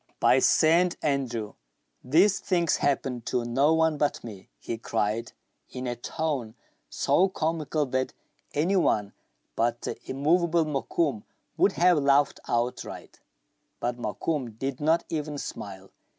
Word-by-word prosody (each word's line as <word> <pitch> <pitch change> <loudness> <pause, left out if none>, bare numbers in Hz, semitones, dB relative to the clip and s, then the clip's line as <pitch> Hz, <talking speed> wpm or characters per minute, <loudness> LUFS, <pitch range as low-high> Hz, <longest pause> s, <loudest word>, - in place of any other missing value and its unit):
" - - -49
By - - +6
St. 170 +3 +4
Andrew! 125 -7 -1 0.5
these 180 +10 +4
things 170 -4 +1
happen 135 -3 0
to 120 -1 -1
no 135 +6 +2
one 160 -2 +2
but 145 - 0
me," 105 -5 -10
he 115 - -5
cried, 115 0 -2 0.4
in 125 0 -6
a 120 -1 -2
tone 130 -2 -3 0.3
so 190 +2 +2
comical 155 -3 -1
that 130 0 -1 0.4
any 165 +7 +2
one 105 - +1 0.4
but 115 +1 0
the - - -3
immovable 165 +4 +2
Mokoum 140 -3 -1 0.3
would 195 - +3
have 175 -2 +4
laughed 140 0 +3
outright. 120 +1 -3 0.6
But 120 0 -2
Mokoum 120 +2 -3
did 135 +1 -3
not 160 +3 +2
even 150 -2 -3
smile. 95 -7 -7
140 Hz, 135 wpm, -27 LUFS, 120-160 Hz, 0.6 s, By